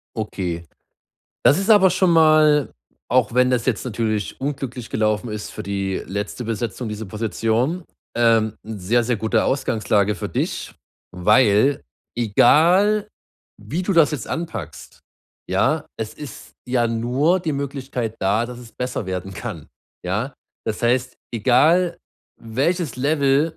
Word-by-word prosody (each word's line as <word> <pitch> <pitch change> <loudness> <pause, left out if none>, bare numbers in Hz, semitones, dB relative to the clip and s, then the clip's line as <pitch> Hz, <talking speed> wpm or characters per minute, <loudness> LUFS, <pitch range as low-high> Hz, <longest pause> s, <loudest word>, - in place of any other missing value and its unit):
Okay, 90 -6 -4 0.8
das 145 - +6
ist 195 +3 0
aber 190 -4 +7
schon 185 -1 +2
mal 155 -3 +5 0.4
auch 120 -2 +2
wenn 125 0 +4
das 125 -2 0
jetzt 125 -3 0
natürlich 110 -2 -2
unglücklich 130 -4 -4
gelaufen 110 +1 0
ist 105 0 -5
für 105 - -7
die 100 -1 -2
letzte 100 +5 -4
Besetzung, 115 +1 -3
diese 105 0 -5
Position, 115 - -1 0.3
ähm, 115 -2 +3
sehr, 110 +2 0
sehr 120 0 0
gute 110 +1 +1
Ausgangslage 105 -6 +1
für - - -5
dich, - - -3 0.4
weil 105 +7 +3 0.3
egal, 175 - +4 0.5
wie 145 - -3
du 195 +2 0
das 165 -3 +4
jetzt 135 -7 -4
anpackst, 110 - -6 0.5
ja, - - +1
es 110 0 -4
ist 150 -3 -10 0.2
ja 120 -2 +2
nur 125 +10 +1
die 165 -3 -2
Möglichkeit 135 -5 -4
da, 105 +5 +1
dass 125 0 -9
es 120 - -13
besser 125 -5 -4
werden 95 +1 -4
kann, 85 -6 -6 0.4
ja? 105 +9 -1 0.3
Das 105 - -3
heißt, 125 +1 +1 0.2
egal 155 - +3 0.4
welches 140 +6 -1
Level 140 +3 +1
120 Hz, 135 wpm, -21 LUFS, 110-145 Hz, 0.8 s, aber